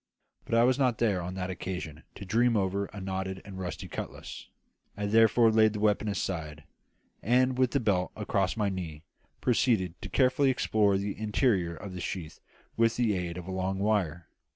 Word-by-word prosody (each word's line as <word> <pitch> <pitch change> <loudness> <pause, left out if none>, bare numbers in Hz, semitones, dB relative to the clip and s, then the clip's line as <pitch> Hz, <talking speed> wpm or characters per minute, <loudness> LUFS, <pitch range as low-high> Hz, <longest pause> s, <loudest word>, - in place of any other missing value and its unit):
But - - -1
I 115 - +5
was 130 +2 +3
not 125 -4 +2
there 105 -6 +1
on 90 +2 -5
that 95 0 -3
occasion 90 -4 -5
to 100 - -8
dream 115 +4 +2
over 100 0 0
a 105 - -10
notched 95 0 -3
and 95 -1 -8
rusty 90 -1 -5
cutlass; - - -7 0.5
I 105 - -2
therefore 115 +2 +5
laid 110 -1 +4
the 105 - -4
weapon 105 0 +2
aside, 80 -7 -3 0.6
and, 130 +3 +3
with 130 0 +2
the 140 - +1
belt 100 -6 0
across 100 -1 -1
my 105 -2 +1
knees, 85 -6 -5 0.4
proceeded 115 -8 +2
to - - -6
carefully 130 +1 +3
explore 105 -6 +2
the 100 +1 -3
interior 105 -5 +1
of 95 +2 -8
the 90 - -6
sheath 80 -4 -5 0.4
with 115 0 +2
the 120 -4 +2
aid 90 -2 -3
of 90 - -7
a - - -4
long 95 +1 -2
wire. 95 -5 0
100 Hz, 185 wpm, -29 LUFS, 90-115 Hz, 0.6 s, I